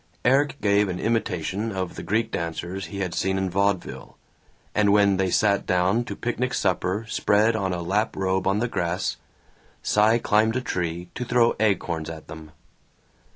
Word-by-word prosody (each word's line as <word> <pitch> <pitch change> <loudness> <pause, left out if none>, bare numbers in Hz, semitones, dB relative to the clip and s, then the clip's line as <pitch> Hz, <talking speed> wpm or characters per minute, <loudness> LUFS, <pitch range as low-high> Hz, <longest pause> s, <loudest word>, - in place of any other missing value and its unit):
Erik 140 +3 +3
gave 100 -1 +3
an 90 -1 -3
imitation 105 -2 -1
of 95 -3 -3
the - - -6
Greek 110 +6 -1
dancers 85 +3 -4
he 100 -1 -6
had 90 -2 -2
seen 95 0 0
in 95 -1 -1
vaudeville, 100 0 -1 0.6
and 105 -1 +3
when 100 -1 +4
they 95 0 +1
sat 100 +2 +2
down 90 +6 +2
to - - -5
picnic 125 +1 -2
supper 95 +3 0
spread 110 +1 +2
on 95 -3 -1
a 90 -1 -3
lap 105 +5 0
robe 95 0 0
on 100 +1 +2
the 120 +3 0
grass, 90 -5 -2 0.7
Cy 110 +2 +4
climbed 110 0 +2
a 130 - 0
tree 90 -5 -3
to - - -4
throw 120 -1 +3
acorns 85 -7 0
at 80 -1 -9
them. 80 0 -10
100 Hz, 170 wpm, -24 LUFS, 90-110 Hz, 0.7 s, when